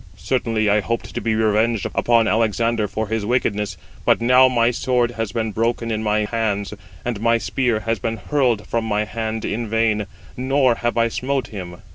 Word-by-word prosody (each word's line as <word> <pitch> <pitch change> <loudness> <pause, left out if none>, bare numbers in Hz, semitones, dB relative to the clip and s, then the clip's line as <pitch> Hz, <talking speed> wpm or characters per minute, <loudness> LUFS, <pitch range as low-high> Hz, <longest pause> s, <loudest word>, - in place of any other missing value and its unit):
Certainly 115 -4 0
I 105 +1 +4
hoped 115 +3 -3
to - - -3
be 110 -1 0
revenged 110 0 +1
upon 115 -2 +3
Alexander 115 0 +1
for 110 +2 -3
his 110 -1 -1
wickedness: 105 -4 -1 0.3
but - - +3
now 125 +2 +6
my 120 -2 +2
sword 125 -1 +1
has 115 -4 -3
been 110 0 -2
broken 115 +2 -1
in 110 0 -1
my 105 0 +1
hands, 105 -3 -2 0.3
and 120 -4 -3
my 115 0 +3
spear 110 +1 0
has 115 0 -1
been 115 +3 -2
hurled 120 -1 0
from 115 -1 -1
my 105 -1 0
hand 110 +2 -4
in 115 +2 -2
vain, 110 -2 +1 0.3
nor 130 0 +2
have 120 +1 -2
I 115 0 +4
smote 130 +2 -2
him." 90 -4 -8
115 Hz, 185 wpm, -21 LUFS, 105-120 Hz, 0.3 s, now